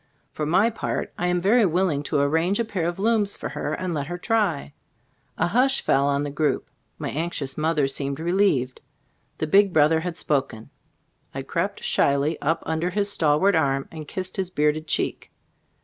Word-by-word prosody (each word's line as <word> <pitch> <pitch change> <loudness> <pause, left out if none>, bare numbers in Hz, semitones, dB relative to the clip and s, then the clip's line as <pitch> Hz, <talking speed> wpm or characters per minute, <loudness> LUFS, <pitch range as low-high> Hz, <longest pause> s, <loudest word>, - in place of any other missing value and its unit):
For 150 - -3
my 195 +8 +3
part, 225 - -3
I 180 - -1
am 180 0 +1
very 220 +6 +4
willing 175 -5 +1
to 150 - +1
arrange 160 +8 +1
a 235 - +1
pair 185 -6 -2
of 175 - -3
looms 210 0 +1
for - - -6
her 150 +1 -3
and 185 -2 -3
let 145 -3 -3
her 175 +1 -4
try." 180 - 0 0.6
A - - +2
hush 255 +6 +2
fell 140 +1 +2
on 140 0 +1
the 145 - -4
group. 150 +1 -1 0.3
My - - -4
anxious 150 -4 -3
mother 155 -2 +1
seemed 140 +1 -2
relieved. 165 -7 +1 0.6
The - - -1
big 195 +5 +4
brother 155 +1 +4
had 175 0 -5
spoken. 135 -6 -2 0.6
I - - -3
crept - - -3
shyly 140 +3 +1
up 160 +3 0
under 160 +2 -1
his 200 +2 0
stalwart 160 +4 +3
arm 135 -4 +1
and 155 -2 -8
kissed 185 +3 -5
his 190 -2 -1
bearded 155 -2 0
cheek. - - -2
160 Hz, 180 wpm, -24 LUFS, 145-190 Hz, 0.6 s, very